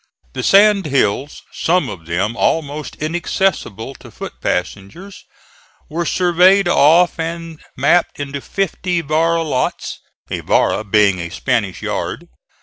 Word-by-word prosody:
The - - -4
sand 200 -2 +5
hills, 135 0 0
some 180 +2 +1
of 80 -3 -9
them 95 +7 -1
almost 150 +1 -1
inaccessible 155 - -2
to - - -13
foot - - -8
passengers, 100 - -4 0.7
were 170 +2 -2
surveyed 185 +2 +4
off 170 +2 +4
and 165 -1 -5 0.2
mapped 145 +6 +2
into 140 -1 -5
fifty 180 -1 -2
vara 165 +2 +1
lots 140 -5 -2 0.3
a - - -2
vara - - +1
being 100 -2 +3
a 85 0 -5
Spanish 100 0 -2
yard. - - -4
155 Hz, 125 wpm, -18 LUFS, 115-175 Hz, 0.7 s, sand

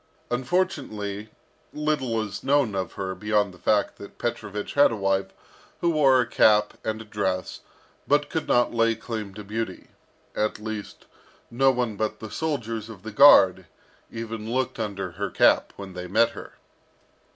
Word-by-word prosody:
Unfortunately, 120 - -2 0.4
little 150 -6 -1
is 105 -2 -7
known 140 -5 +2
of 95 -3 -3
her 95 -1 -4
beyond 105 -1 0
the 90 - -16
fact 105 -1 +1
that 100 - -11
Petrovich 105 -3 -4
had 145 -3 +5
a - - -2
wife, 95 -1 0 0.5
who 170 - +2
wore 140 -5 +4
a 125 - +2
cap 105 -2 +4
and 110 0 -2
a 110 - -9
dress, 95 -4 -2 0.5
but 145 0 +3
could 160 +2 -3
not 120 0 +2
lay 115 -1 +2
claim 110 -3 -6
to 105 - -8
beauty, 105 -1 -5 0.5
at 105 0 0
least, 110 -1 -7 0.5
no 135 +3 +4
one 120 -5 -1
but 110 0 -2
the 110 -2 -8
soldiers 115 -7 -3
of 100 -4 -11
the 110 - -6
guard 95 - +7 0.4
even 115 -1 -6
looked 130 -1 -1
under 100 -4 -3
her 85 - -4
cap - - +3
when 95 -2 -9
they 90 0 -6
met 110 +5 +3
her. - - -10
110 Hz, 160 wpm, -25 LUFS, 100-125 Hz, 0.5 s, guard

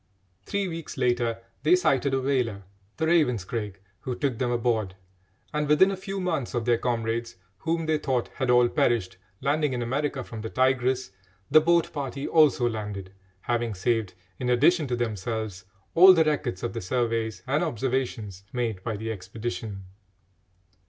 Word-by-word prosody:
Three 200 -1 -1
weeks 165 -3 -6
later 120 -2 +1 0.2
they 360 - +5
sighted 140 - +2
a - - +1
whaler, 125 -7 0 0.3
the 160 - 0
Ravenscraig, 115 - 0 0.2
who 125 - -4
took 125 -2 -1
them 125 - 0
aboard, 115 -5 0 0.6
and 150 -1 -1
within 190 +6 +5
a - - -2
few 195 +1 -5
months 165 -10 -2
of 120 -2 -1
their 120 -1 +3
comrades, 115 -1 -2 0.2
whom 165 +3 -1
they 155 -1 +1
thought 130 -5 -1
had 130 -3 -3
all 125 0 +6
perished, 115 -6 +1 0.2
landing 145 0 +1
in 120 -1 -2
America 135 +2 -1
from 115 -2 -8
the 110 - -5
Tigress, 130 -2 +1 0.4
the 155 +2 +8
boat 170 +1 +2
party 140 -1 -4
also 150 -6 +4
landed, 105 -4 -5 0.3
having 120 -1 -1
saved, 110 -1 0 0.2
in 125 - -1
addition 150 +6 +4
to 125 - -1
themselves, 110 -3 -3 0.3
all 185 +2 +9
the 165 - +5
records 150 -11 -1
of 120 - -2
the 115 - -4
surveys 115 +1 -1
and 145 +5 +1
observations 125 - -2
made 115 -6 -2
by 110 0 -3
the 110 +2 -4
expedition. 105 0 -5
125 Hz, 160 wpm, -26 LUFS, 115-145 Hz, 0.6 s, all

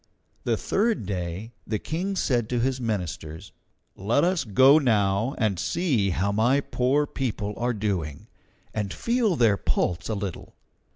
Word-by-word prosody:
The - - +1
third 215 - 0
day, 95 +3 -4 0.2
the 110 - 0
King 180 - -3
said 120 - 0
to 125 - 0
his 130 +1 0
ministers: 95 -5 -4 0.4
"Let 115 +9 +1
us 175 -4 +1
go 130 +8 +6
now 110 -1 +1
and 105 -6 0
see 125 - +1
how 95 +3 0
my 120 +7 +3
poor 140 +2 +1
people 110 -7 -3
are 120 +1 0
doing, 95 - -3 0.5
and 105 -3 -2
feel 235 - +1
their 110 -7 +3
pulse 85 -1 -1
a 110 - -1
little." 100 -4 -6
110 Hz, 150 wpm, -25 LUFS, 100-135 Hz, 0.5 s, go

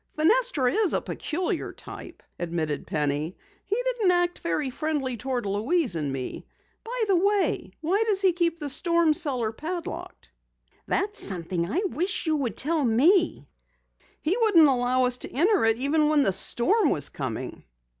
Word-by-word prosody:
"Fenestra 325 - +3
is 425 -4 +2
a - - +2
peculiar 350 +3 -3
type," - - -10 0.2
admitted 165 -4 -3
Penny. 150 +2 -2 0.3
"He 400 - 0
didn't 480 -6 +1
act 350 0 +1
very 210 - -2
friendly 285 -3 -2
toward 245 0 -3
Louise 225 - 0
and 150 -4 -2
me. 130 -1 -6 0.4
By 480 0 -3
the 390 - +3
way, 400 +2 +1
why 375 +7 +1
does 405 -3 +2
he 380 -2 +3
keep 335 -1 0
the 300 -3 -5
storm 335 +2 +2
cellar 255 -8 0
padlocked?" 335 +8 -6 0.6
"That's 415 +2 0
something 175 -1 -2
I 370 +6 0
wish 365 +2 -2
you 315 -1 +1
would 260 -5 -3
tell 310 +1 0
me." 290 - +3 0.8
"He 340 +6 +1
wouldn't 360 -9 +6
allow 255 -1 +2
us 250 0 +1
to - - -6
enter 355 - +3
it 225 0 +3
even 300 +4 +2
when 300 -2 +4
the 195 - +1
storm 315 - +2
was 145 - 0
coming." 130 -6 -5
300 Hz, 160 wpm, -26 LUFS, 225-360 Hz, 0.8 s, wouldn't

